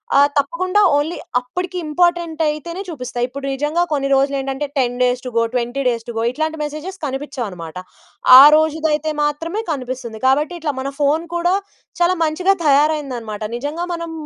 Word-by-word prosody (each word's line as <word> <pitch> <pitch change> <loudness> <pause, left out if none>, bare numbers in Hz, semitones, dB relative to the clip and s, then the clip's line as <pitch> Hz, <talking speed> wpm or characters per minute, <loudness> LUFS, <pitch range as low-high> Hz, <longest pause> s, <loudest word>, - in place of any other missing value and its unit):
ఆహ్, 280 +1 +6
తప్పకుండా 365 +8 +1 0.2
ఓన్లీ 300 +4 0 0.2
అప్పటికి 360 +9 -5
ఇంపార్టెంట్ 340 0 +1
అయితేనే 335 +5 -4
చూపిస్తాయి. 250 -6 -3
ఇప్పుడు 275 +2 -7
నిజంగా 295 +6 0
కొన్ని 275 -2 0
రోజులేంటంటే 270 +1 0
10 245 -2 0
days 250 0 +1
to - - -3
go, 230 - +4
20 245 +2 -1
days 230 -2 -1
to 235 - -5
go 225 - 0
ఇట్లాంటి 315 +3 -2
మెసేజెస్ 305 +6 -6
కనిపిచ్చవన్నమాట. 240 - -5 0.6
ఆ - - +12
రోజుదయితే 315 -1 +1
మాత్రమే 330 +8 -2
కనిపిస్తుంది. 250 -5 -5
కాబట్టి 295 +6 +2
ఇట్లా 300 -3 -2
మన 270 +1 -3
ఫోన్ 295 +4 +1
కూడా 350 +1 +1 0.5
చాలా 350 +1 +4
మంచిగా 360 +5 +1
తయారైందనమాట. 275 -7 +1
నిజంగా 295 +7 -3
మనం 335 -1 -5
295 Hz, 150 wpm, -19 LUFS, 260-325 Hz, 0.6 s, ఆ